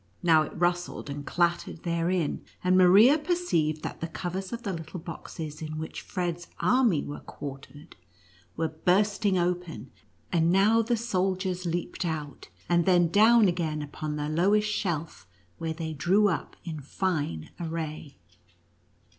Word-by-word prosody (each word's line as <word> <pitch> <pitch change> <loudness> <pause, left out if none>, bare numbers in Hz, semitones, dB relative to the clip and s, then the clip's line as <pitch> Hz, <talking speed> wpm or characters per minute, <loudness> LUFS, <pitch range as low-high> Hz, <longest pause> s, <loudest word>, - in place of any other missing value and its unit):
Now 165 -2 +6
it 155 - -5
rustled 175 -4 -1
and 145 +1 -5
clattered 170 -1 0
therein, 170 -1 0 0.2
and 185 0 +3
Maria 200 - +7
perceived 235 - 0
that - - -6
the 165 - -2
covers 185 +3 -5
of 235 0 -5
the 200 -4 -2
little 165 +2 -6
boxes 160 -2 -7
in 155 0 -5
which 160 +1 -5
Fred's 175 -2 -3
army 240 - +3
were 145 - -6
quartered, 145 +2 -10 0.6
were 160 -1 0
burst 195 +7 +1
ing 190 -2 +3
open, 175 -1 -2 0.4
and 170 -1 +3
now 210 +5 +4
the 235 +1 0
soldiers 185 -4 -1
leaped 170 +2 -3
out, 150 - -5 0.2
and 170 0 +2
then 175 -2 +4
down 220 +3 +6
again 160 -4 -1
upon 150 +1 -5
the 150 0 -2
lowest 200 +7 +2
shelf, 165 - -3 0.3
where 165 -1 -2
they 160 -1 -5
drew 185 +8 +3
up 165 - -3
in 160 -3 -5
fine 145 - -2
array. 160 -3 -5
175 Hz, 145 wpm, -27 LUFS, 155-190 Hz, 0.6 s, Maria